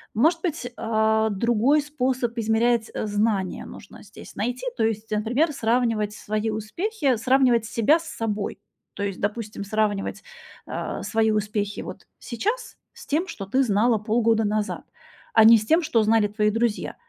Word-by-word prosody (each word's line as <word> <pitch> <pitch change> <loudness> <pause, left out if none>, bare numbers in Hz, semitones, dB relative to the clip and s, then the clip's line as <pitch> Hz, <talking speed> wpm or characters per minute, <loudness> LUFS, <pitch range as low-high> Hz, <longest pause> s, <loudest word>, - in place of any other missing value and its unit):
Может 320 +9 +3
быть, 310 -8 -3
а, 220 0 +1
другой 235 +8 +2
способ 255 -4 -2
измерять, 225 +1 +1
э, 215 - -3
знания 205 -3 -1
нужно 205 - -12
здесь 205 - -13
найти, 245 +4 -3
то - - +1
есть, 220 0 -3
например, 245 +10 +1
сравнивать 225 -4 0
свои 215 +1 -3
успехи 265 - -1
сравнивать 250 -1 +3
себя 240 +9 +3
с 335 - -11
собой. 215 -6 -3 0.4
То 205 - -4
есть, 195 -2 -3
допустим, 210 -1 -3
сравнивать, 205 -1 -1 0.4
а, - - -5
свои 220 -1 +1
успехи 210 -1 -2
вот - - -9
сейчас 440 - -3 0.2
с - - -13
тем, 325 +6 0
что 195 - -7
ты 260 +7 +2
знала 225 +1 +2
полгода 225 +1 +1
назад, 210 0 -2 0.5
а 220 - +7
не 230 +1 +9
с 215 - -4
тем, 325 +7 +3
что 240 -8 +2
знали 215 -1 +3
твои 210 +1 +1
друзья. 225 -1 -1
225 Hz, 160 wpm, -24 LUFS, 210-250 Hz, 0.5 s, не